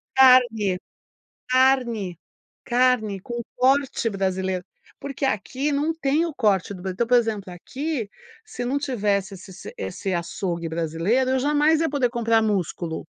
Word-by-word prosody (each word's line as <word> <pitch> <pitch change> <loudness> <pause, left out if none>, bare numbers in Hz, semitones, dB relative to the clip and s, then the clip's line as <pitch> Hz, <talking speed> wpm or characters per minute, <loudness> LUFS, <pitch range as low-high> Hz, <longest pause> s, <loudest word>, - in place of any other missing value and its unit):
carne, 240 -8 +5 0.7
carne, 250 -8 +2 0.5
carne 240 -5 +2
com 240 +3 -5 0.2
corte 265 -2 +2
brasileiro. 190 -2 -2 0.3
Porque 280 0 -5
aqui 265 +6 -1
não 295 +3 +1
tem 315 +1 +1
o 335 - -3
corte 205 -5 +1
do 185 - -9
Brasil 190 0 -4
então, 235 +5 0
por 245 - +4
exemplo, 210 -5 -2
aqui, 260 - -4 0.4
se 245 - -5
não 270 +4 0
tivesse 205 -7 -1
esse 190 +1 -12
se 185 - -10
esse 180 - -4
açougue 170 0 -3
brasileiro 170 +11 0
eu 265 - +2
jamais 295 +3 +3
ia 320 - 0
poder 270 -4 +1
comprar 230 -2 +2
músculo. 180 -6 -2
230 Hz, 145 wpm, -24 LUFS, 190-265 Hz, 0.7 s, carne